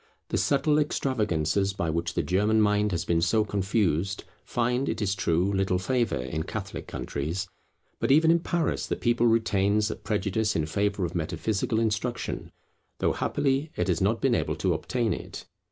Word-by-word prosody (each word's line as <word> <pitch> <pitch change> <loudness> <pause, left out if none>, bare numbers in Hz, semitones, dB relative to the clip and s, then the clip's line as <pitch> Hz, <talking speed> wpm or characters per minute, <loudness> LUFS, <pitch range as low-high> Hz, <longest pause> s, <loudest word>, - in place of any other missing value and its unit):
The - - 0
subtle 150 +1 +2
extravagances 100 - 0
by 90 -5 -1
which 85 +1 -2
the - - +1
German 105 +4 +2
mind 105 0 +2
has 85 -2 -2
been 85 -1 +1
so 105 +5 +2
confused, 95 -3 0 0.2
find, 125 +3 0
it - - -2
is 100 -3 0
true, 95 +1 +1
little 95 -1 +1
favour 120 - 0
in 75 +5 -3
Catholic - - -5
countries. 80 +7 -3 0.5
But - - 0
even 160 +3 +6
in 170 - +4
Paris 165 -2 -1
the - - -1
people 120 0 +2
retains 105 -2 +2
a - - -4
prejudice 105 0 -1
in 80 - +1
favour 100 +3 0
of 85 - -5
metaphysical 90 +6 -1
instruction, 115 +2 -2 0.5
though - - +1
happily 140 +2 0
it - - -1
has 85 0 +1
not 110 +4 +1
been 135 -3 +3
able - - 0
to 95 -2 +1
obtain 110 +8 -1
it. - - -7
100 Hz, 170 wpm, -27 LUFS, 90-115 Hz, 0.5 s, even